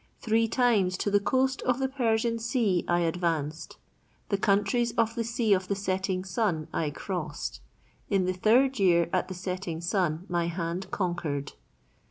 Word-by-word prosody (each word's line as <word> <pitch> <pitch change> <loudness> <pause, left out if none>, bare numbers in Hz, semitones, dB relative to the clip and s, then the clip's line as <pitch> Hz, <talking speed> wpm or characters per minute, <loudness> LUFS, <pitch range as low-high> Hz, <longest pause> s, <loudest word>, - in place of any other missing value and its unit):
"Three 225 0 +2
times 215 -7 +2
to 205 - -1
the 205 - +5
coast 260 +5 +1
of 250 -1 +1
the 265 0 0
Persian 230 -3 0
sea 225 -6 +1
I 175 0 +2
advanced." 160 -2 -2 0.5
"The 200 - +1
countries 205 +4 +2
of 230 -1 +1
the 230 -1 -2
Sea 230 -2 +1
of 185 -1 0
the 200 - 0
setting 190 -1 -2
Sun 180 -5 -1
I 155 - 0
crossed." 160 0 -5 0.5
"In 195 -3 +2
the 185 - 0
third 245 +8 +3
year 170 -3 +3
at 185 0 +1
the 185 - -6
setting 180 -2 -4
Sun 175 -1 -1
my 175 -2 0
hand 170 +2 -3
conquered." 170 -7 -2
190 Hz, 165 wpm, -28 LUFS, 175-225 Hz, 0.5 s, the